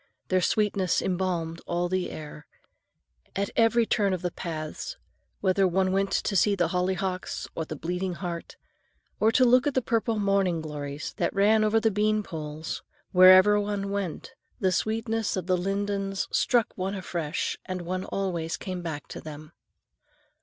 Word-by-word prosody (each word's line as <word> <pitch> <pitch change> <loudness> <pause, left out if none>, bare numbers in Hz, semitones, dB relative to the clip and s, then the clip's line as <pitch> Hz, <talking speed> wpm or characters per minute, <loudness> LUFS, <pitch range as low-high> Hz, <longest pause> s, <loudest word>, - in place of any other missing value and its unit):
Their 185 0 +3
sweetness 200 -2 +1
embalmed 175 -3 -2
all 175 +1 0
the 185 0 -1
air. 150 -1 -9 0.9
At 200 0 -1
every 230 0 +4
turn 200 -3 +1
of 185 - -3
the 180 - -1
paths,—whether 185 - -3
one 185 +1 +1
went 195 +1 +1
to 200 - 0
see 200 +2 +4
the 175 -4 +1
hollyhocks 185 +1 -2
or 160 - -3
the 155 - -6
bleeding 180 +4 -3
heart, 170 -2 -6 0.6
or 220 +1 +4
to 255 - +5
look 250 +3 +5
at 285 - -1
the 260 - +3
purple 230 -1 0
morning 195 -4 +2
glories 150 -2 -5
that 170 - -1
ran 215 +2 +4
over 215 +1 +3
the 225 0 +2
bean 215 +1 +1
poles,—wherever 185 +5 +3
one 205 -1 -2
went, 200 +3 -4 0.3
the 190 -5 +2
sweetness 220 +1 -1
of 185 - -3
the 185 0 +2
lindens 195 +1 -1
struck 240 -3 +2
one 190 +2 -2
afresh 175 -4 -3
and 185 -1 -4
one 185 +2 -3
always 175 -4 -2
came 185 -2 -5
back 160 -4 -5
to - - -7
them. 155 0 -9
185 Hz, 155 wpm, -27 LUFS, 175-205 Hz, 0.9 s, to